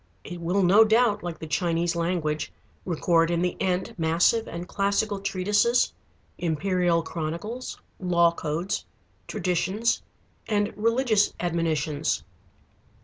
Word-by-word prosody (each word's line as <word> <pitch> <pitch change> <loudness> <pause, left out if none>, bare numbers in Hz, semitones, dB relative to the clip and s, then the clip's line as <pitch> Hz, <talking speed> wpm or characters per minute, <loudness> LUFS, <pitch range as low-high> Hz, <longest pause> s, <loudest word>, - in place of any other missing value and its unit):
It 175 -1 -8
will 180 +4 +1
no 195 +5 +7
doubt, 220 0 +3
like 175 -2 -5
the - - -7
Chinese 170 +1 0
language, 165 -3 -1 0.3
record 165 -1 +2
in 170 0 +1
the 180 - 0
end 185 -1 0
massive 170 +8 +2
and 170 +1 -6
classical 200 +1 0
treatises, 205 +5 +2 0.5
imperial 175 +1 +1
chronicles, 170 +11 -5 0.2
law 170 -2 +3
codes, 170 +5 -3 0.4
traditions, 195 +6 0 0.5
and 205 -1 0
religious 230 -1 +2
admonitions. 160 -3 -1
180 Hz, 110 wpm, -26 LUFS, 165-205 Hz, 0.5 s, no